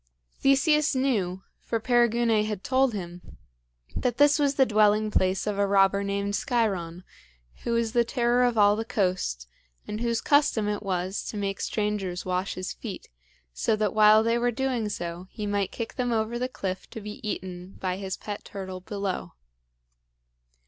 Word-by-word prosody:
Theseus 300 Hz, +2 st, +3 dB
knew 200 Hz, -9 st, 0 dB, 0.2 s
for 230 Hz, -, -2 dB
Perigune 235 Hz, -1 st, +3 dB
had 210 Hz, -3 st, -4 dB
told 260 Hz, -3 st, +2 dB
him 175 Hz, -2 st, -8 dB, 0.6 s
that 245 Hz, -2 st, -1 dB
this 290 Hz, +1 st, +5 dB
was 285 Hz, -1 st, +2 dB
the 265 Hz, -, +5 dB
dwelling 215 Hz, -1 st, +3 dB
place 185 Hz, -1 st, +1 dB
of 205 Hz, -1 st, -2 dB
a 200 Hz, -, +3 dB
robber 195 Hz, 0 st, +3 dB
named 200 Hz, 0 st, -2 dB
Sciron, 190 Hz, -8 st, -1 dB, 0.5 s
who 235 Hz, -, -3 dB
was 230 Hz, -1 st, +1 dB
the 235 Hz, +1 st, +3 dB
terror 240 Hz, 0 st, +1 dB
of 245 Hz, -2 st, +1 dB
all 205 Hz, 0 st, +6 dB
the 220 Hz, -, -2 dB
coast, 185 Hz, -, -1 dB, 0.4 s
and 210 Hz, +2 st, -4 dB
whose 235 Hz, -1 st, 0 dB
custom 285 Hz, -7 st, +2 dB
it 210 Hz, 0 st, -2 dB
was 185 Hz, -1 st, -2 dB
to 215 Hz, -, -5 dB
make 195 Hz, -1 st, -2 dB
strangers 205 Hz, -4 st, -2 dB
wash 185 Hz, +1 st, -1 dB
his 185 Hz, 0 st, -4 dB
feet, 210 Hz, -6 st, -8 dB, 0.4 s
so 215 Hz, -, +1 dB
that 210 Hz, -2 st, 0 dB
while 215 Hz, 0 st, +6 dB
they 230 Hz, +1 st, +1 dB
were 245 Hz, +1 st, +2 dB
doing 245 Hz, -3 st, -1 dB
so, 175 Hz, -1 st, -5 dB
he 210 Hz, -, -6 dB
might 205 Hz, -2 st, -1 dB
kick 230 Hz, -, -5 dB
them 245 Hz, -1 st, -1 dB
over 225 Hz, +1 st, -1 dB
the 255 Hz, +1 st, -1 dB
cliff 190 Hz, -6 st, -5 dB
to -, -, -7 dB
be 210 Hz, +2 st, -8 dB
eaten, 185 Hz, -4 st, -6 dB
by 185 Hz, -1 st, -2 dB
his 190 Hz, -1 st, -4 dB
pet 205 Hz, -1 st, -6 dB
turtle 190 Hz, -2 st, -7 dB
below. 190 Hz, -, -4 dB
210 Hz, 170 wpm, -26 LUFS, 190-235 Hz, 0.6 s, all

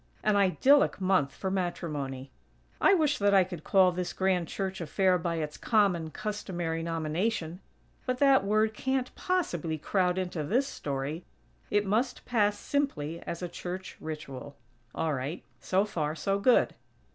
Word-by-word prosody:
An 215 Hz, -1 st, +3 dB
idyllic 205 Hz, +10 st, +4 dB
month 185 Hz, -7 st, +2 dB
for 190 Hz, +7 st, -4 dB
matrimony. 150 Hz, -8 st, -3 dB, 0.5 s
I 390 Hz, -, +6 dB
wish 300 Hz, -4 st, +2 dB
that 200 Hz, 0 st, +4 dB
I 190 Hz, -, +7 dB
could 175 Hz, -3 st, -8 dB
call 190 Hz, -2 st, +5 dB
this 180 Hz, 0 st, -3 dB
grand 185 Hz, -3 st, +1 dB
church 190 Hz, 0 st, -4 dB
affair 180 Hz, +3 st, +2 dB
by 170 Hz, 0 st, -1 dB
its 155 Hz, -2 st, -4 dB
common, 195 Hz, -8 st, +2 dB
customary 175 Hz, -5 st, -3 dB
nomination; 165 Hz, +2 st, -2 dB, 0.5 s
but 255 Hz, 0 st, 0 dB
that 275 Hz, -4 st, +5 dB
word 215 Hz, +2 st, +2 dB
can't 260 Hz, +3 st, -1 dB
possibly 175 Hz, -, -1 dB
crowd 180 Hz, +3 st, +1 dB
into 180 Hz, -4 st, -2 dB
this 240 Hz, -, +1 dB
story. 145 Hz, -, -4 dB, 0.5 s
It 205 Hz, 0 st, +2 dB
must 235 Hz, +6 st, 0 dB
pass 210 Hz, -4 st, +2 dB
simply 170 Hz, -, -2 dB
as 170 Hz, +1 st, -4 dB
a -, -, -1 dB
church 180 Hz, +2 st, -6 dB
ritual. 145 Hz, -3 st, -7 dB, 0.4 s
All 160 Hz, -1 st, 0 dB
right; 140 Hz, +5 st, -4 dB, 0.2 s
so 190 Hz, +2 st, +1 dB
far, 155 Hz, -6 st, -2 dB
so 195 Hz, +4 st, 0 dB
good. 245 Hz, +4 st, +4 dB
185 Hz, 150 wpm, -29 LUFS, 160-210 Hz, 0.5 s, I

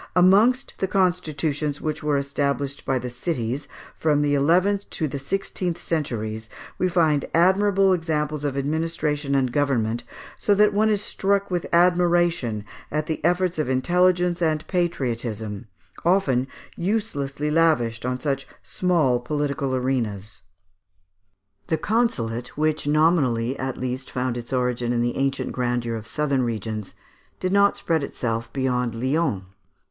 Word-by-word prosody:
Amongst 205 Hz, +9 st, +4 dB
the 190 Hz, -, 0 dB
constitutions 155 Hz, -6 st, 0 dB
which 155 Hz, -1 st, -3 dB
were 150 Hz, -1 st, +1 dB
established 140 Hz, 0 st, -2 dB
by 135 Hz, -, +2 dB
the 125 Hz, 0 st, -4 dB
cities, 125 Hz, -1 st, -3 dB, 0.3 s
from 150 Hz, -2 st, +2 dB
the 145 Hz, 0 st, +1 dB
eleventh 180 Hz, +8 st, +2 dB
to 155 Hz, -, -1 dB
the 140 Hz, 0 st, -4 dB
sixteenth 180 Hz, +2 st, -2 dB
centuries, 110 Hz, -10 st, -3 dB, 0.3 s
we 185 Hz, -, +2 dB
find 160 Hz, -5 st, +2 dB
admirable 190 Hz, +2 st, +4 dB
examples 155 Hz, -3 st, -1 dB
of 140 Hz, -2 st, -2 dB
administration 150 Hz, -1 st, -1 dB
and 130 Hz, -2 st, +1 dB
government, 120 Hz, -5 st, 0 dB, 0.4 s
so 205 Hz, -, +3 dB
that 210 Hz, +1 st, +4 dB
one 215 Hz, +2 st, +3 dB
is 210 Hz, -1 st, +2 dB
struck 200 Hz, 0 st, +1 dB
with 175 Hz, -2 st, -1 dB
admiration 175 Hz, -, +2 dB, 0.2 s
at 150 Hz, 0 st, -1 dB
the 155 Hz, -1 st, -4 dB
efforts 175 Hz, 0 st, +1 dB
of 150 Hz, -, 0 dB
intelligence 175 Hz, +5 st, +2 dB
and 155 Hz, -1 st, +1 dB
patriotism, 115 Hz, -, -2 dB, 0.4 s
often 145 Hz, -8 st, +2 dB, 0.3 s
uselessly 150 Hz, -8 st, -2 dB
lavished 150 Hz, -8 st, +2 dB
on 125 Hz, +1 st, -2 dB
such 140 Hz, 0 st, -2 dB, 0.2 s
small 160 Hz, -9 st, +1 dB
political 140 Hz, +1 st, -2 dB
arenas. 115 Hz, -6 st, -2 dB, 1.3 s
The 160 Hz, -, +1 dB
consulate, 125 Hz, -, -1 dB
which 155 Hz, -1 st, 0 dB
nominally 145 Hz, -6 st, +2 dB
at 130 Hz, -1 st, -3 dB
least 130 Hz, +1 st, -4 dB
found 125 Hz, -1 st, -2 dB
its 120 Hz, +1 st, -6 dB
origin 125 Hz, -2 st, 0 dB
in 120 Hz, -, +1 dB
the 120 Hz, 0 st, 0 dB
ancient 135 Hz, 0 st, -1 dB
grandeur 120 Hz, -2 st, -1 dB
of 110 Hz, -1 st, -7 dB
southern 140 Hz, -3 st, 0 dB
regions, 110 Hz, -3 st, -4 dB, 0.4 s
did 185 Hz, -, -1 dB
not 200 Hz, 0 st, +4 dB
spread 160 Hz, -3 st, 0 dB
itself 115 Hz, -4 st, -3 dB
beyond 125 Hz, -3 st, -1 dB
Lyons. 130 Hz, -, 0 dB
145 Hz, 135 wpm, -24 LUFS, 125-175 Hz, 1.3 s, Amongst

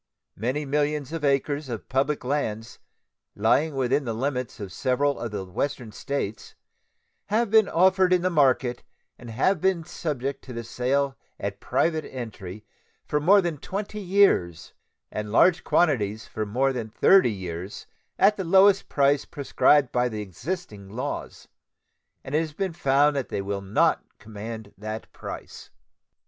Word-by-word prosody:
Many 130 Hz, +8 st, -2 dB
millions 145 Hz, 0 st, -1 dB
of 165 Hz, -2 st, -4 dB
acres 140 Hz, 0 st, 0 dB
of 115 Hz, -3 st, -6 dB
public 140 Hz, +2 st, 0 dB
lands 120 Hz, -5 st, -3 dB, 0.6 s
lying 140 Hz, +8 st, +2 dB
within 135 Hz, +2 st, +1 dB
the 115 Hz, -3 st, -3 dB
limits 125 Hz, -1 st, -3 dB
of 100 Hz, -3 st, -7 dB
several 140 Hz, +5 st, 0 dB
of 120 Hz, -, -3 dB
the 100 Hz, -2 st, -5 dB
Western 115 Hz, +4 st, -3 dB
States 110 Hz, -2 st, -4 dB, 0.7 s
have 220 Hz, 0 st, +1 dB
been 220 Hz, -2 st, +5 dB
offered 185 Hz, +1 st, +4 dB
in 180 Hz, -1 st, +3 dB
the 185 Hz, -, +1 dB
market 130 Hz, -5 st, +2 dB, 0.4 s
and 120 Hz, -, -10 dB, 0.3 s
been 190 Hz, -3 st, +1 dB
subject 140 Hz, -5 st, -4 dB
to 115 Hz, -3 st, -6 dB
sale 130 Hz, +2 st, -1 dB, 0.2 s
at 100 Hz, 0 st, -4 dB
private 160 Hz, -2 st, 0 dB
entry 110 Hz, -5 st, -7 dB, 0.4 s
for 150 Hz, -, 0 dB
more 195 Hz, +7 st, +5 dB
than 170 Hz, -5 st, -3 dB
twenty 205 Hz, +6 st, -5 dB
years 175 Hz, -, +2 dB, 0.4 s
and 105 Hz, -1 st, -4 dB
large 175 Hz, +9 st, +4 dB
quantities 110 Hz, -, +1 dB
for 110 Hz, -1 st, -4 dB
more 135 Hz, +6 st, +1 dB
than 115 Hz, -3 st, -4 dB
thirty 190 Hz, -, +5 dB
years 90 Hz, -1 st, -6 dB, 0.3 s
at 205 Hz, +2 st, +4 dB
the 190 Hz, -, -2 dB
lowest 195 Hz, +3 st, +5 dB
price 140 Hz, 0 st, +3 dB
prescribed 140 Hz, -1 st, +2 dB
by 125 Hz, 0 st, +1 dB
the 105 Hz, -2 st, -4 dB
existing 105 Hz, -, -6 dB
laws, 125 Hz, +7 st, -5 dB, 0.8 s
and 135 Hz, -, -8 dB
it 155 Hz, -, +4 dB
has 160 Hz, -2 st, -3 dB
been 190 Hz, +2 st, -2 dB
found 145 Hz, -1 st, +3 dB
that 135 Hz, -3 st, -2 dB
they 100 Hz, -, -3 dB
will 100 Hz, 0 st, -3 dB
not 100 Hz, +2 st, +2 dB
command 110 Hz, 0 st, -8 dB
that 110 Hz, +1 st, -6 dB
price. -, -, -9 dB
135 Hz, 150 wpm, -25 LUFS, 110-155 Hz, 0.8 s, been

